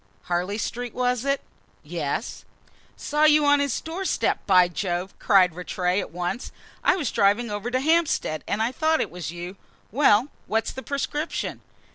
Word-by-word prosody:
"Harley 180 Hz, +4 st, -1 dB
Street, 240 Hz, +2 st, -4 dB
was 250 Hz, -1 st, 0 dB
it?" 275 Hz, 0 st, +1 dB, 0.4 s
"Yes." -, -, -4 dB, 0.5 s
"Saw 300 Hz, +1 st, +1 dB
you 300 Hz, -1 st, +5 dB
on 290 Hz, 0 st, +5 dB
his 280 Hz, -3 st, 0 dB
doorstep, 360 Hz, +4 st, -1 dB
by 185 Hz, -2 st, +6 dB
Jove!" 175 Hz, +1 st, -3 dB
cried 185 Hz, -4 st, +4 dB
Rattray 180 Hz, +1 st, -1 dB
at -, -, -4 dB
once. 180 Hz, +7 st, -4 dB, 0.3 s
"I -, -, +4 dB
was 330 Hz, -7 st, -2 dB
driving 210 Hz, +3 st, +2 dB
over 205 Hz, +3 st, -3 dB
to 255 Hz, +1 st, 0 dB
Hampstead, 305 Hz, -, +1 dB
and 215 Hz, +2 st, 0 dB
I 235 Hz, -, 0 dB
thought 315 Hz, +4 st, +1 dB
it -, -, -1 dB
was 175 Hz, -3 st, -5 dB
you. 175 Hz, +3 st, -7 dB, 0.3 s
Well, 250 Hz, 0 st, +4 dB, 0.2 s
what's 220 Hz, +1 st, 0 dB
the 265 Hz, -, -7 dB
prescription?" 295 Hz, +3 st, -3 dB
225 Hz, 160 wpm, -25 LUFS, 180-285 Hz, 0.5 s, by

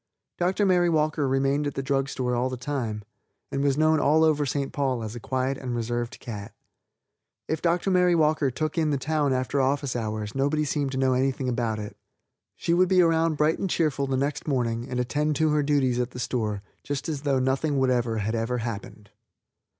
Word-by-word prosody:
Dr. 185 Hz, +4 st, +1 dB
Mary 180 Hz, -2 st, +3 dB
Walker 155 Hz, -2 st, +1 dB
remained 135 Hz, +2 st, +1 dB
at 145 Hz, -, -4 dB
the 135 Hz, -, -2 dB
drug 135 Hz, 0 st, 0 dB
store 125 Hz, -2 st, -2 dB
all 125 Hz, +2 st, 0 dB
the 130 Hz, -, -5 dB
time, 120 Hz, -5 st, -3 dB, 0.5 s
and 135 Hz, -, -1 dB
was 140 Hz, -1 st, +2 dB
known 155 Hz, 0 st, +4 dB
all 155 Hz, +3 st, +4 dB
over 150 Hz, -2 st, +2 dB
St. 140 Hz, +1 st, -2 dB
Paul 130 Hz, -5 st, -1 dB
as 110 Hz, +1 st, -6 dB
a -, -, -5 dB
quiet 130 Hz, +3 st, -2 dB
and 125 Hz, -2 st, -4 dB
reserved 120 Hz, +1 st, -3 dB
cat. 105 Hz, -5 st, -7 dB, 0.9 s
If 160 Hz, -, -2 dB
Dr. 175 Hz, +3 st, +1 dB
Mary 180 Hz, -1 st, +4 dB
Walker 155 Hz, -3 st, +2 dB
took 155 Hz, +5 st, -2 dB
in 155 Hz, -1 st, +2 dB
the 145 Hz, -, +1 dB
town 150 Hz, 0 st, 0 dB
after 130 Hz, +2 st, 0 dB
office 135 Hz, 0 st, 0 dB
hours 110 Hz, -2 st, -3 dB
nobody 145 Hz, +3 st, +1 dB
seemed 145 Hz, -2 st, -1 dB
to -, -, -2 dB
know 130 Hz, -1 st, +2 dB
anything 130 Hz, 0 st, 0 dB
about 120 Hz, -3 st, -1 dB
it. 105 Hz, -1 st, -7 dB, 0.6 s
She 170 Hz, -, -1 dB
would 180 Hz, +1 st, +4 dB
be 185 Hz, -1 st, +5 dB
around 165 Hz, -1 st, +2 dB
bright 155 Hz, +2 st, +2 dB
and 195 Hz, -, -1 dB
cheerful 150 Hz, -5 st, 0 dB
the 135 Hz, -1 st, 0 dB
next 140 Hz, +4 st, -2 dB
morning, 120 Hz, -4 st, -1 dB
and 125 Hz, -, -2 dB
attend 150 Hz, +5 st, 0 dB
to 155 Hz, +2 st, +2 dB
her 150 Hz, 0 st, +2 dB
duties 140 Hz, -4 st, +1 dB
at 125 Hz, 0 st, 0 dB
the 125 Hz, -, -9 dB
store 110 Hz, -4 st, -2 dB, 0.2 s
just 145 Hz, +2 st, -4 dB
as 150 Hz, -4 st, -3 dB
though 140 Hz, -2 st, +1 dB
nothing 135 Hz, +3 st, 0 dB
whatever 125 Hz, -4 st, +1 dB
had 110 Hz, +1 st, -1 dB
ever 115 Hz, +2 st, -1 dB
happened. 105 Hz, -3 st, -6 dB
135 Hz, 205 wpm, -26 LUFS, 125-150 Hz, 0.9 s, be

